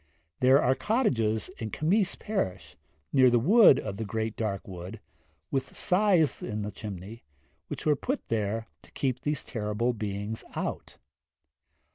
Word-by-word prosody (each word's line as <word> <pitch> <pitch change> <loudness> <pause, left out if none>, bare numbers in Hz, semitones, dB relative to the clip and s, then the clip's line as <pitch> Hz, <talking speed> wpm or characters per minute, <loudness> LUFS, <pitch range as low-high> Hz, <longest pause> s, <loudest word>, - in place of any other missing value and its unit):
There 130 +2 +6
are 130 - +3
cottages 130 - 0
in 110 - -4
Cemmaes 180 - +1
parish, 95 - -3 0.4
near 130 -2 +6
the 120 - +4
Wood 180 - +6
of 100 -2 -5
the 110 - -3
Great 110 +1 -3
Dark 100 -4 -3
Wood, 95 +3 -8 0.5
with 135 -1 -2
scythes 180 -5 +3
in 105 -2 -3
the 105 - -4
chimneys, 105 +2 -8 0.5
which - - -6
were 150 -1 +4
put 265 - -3
there 110 0 -1 0.2
to - - -18
keep 130 -2 -1
these 150 0 -2
terrible 110 +1 -1
beings 105 0 -3
out. - - -4
115 Hz, 145 wpm, -28 LUFS, 105-145 Hz, 0.5 s, There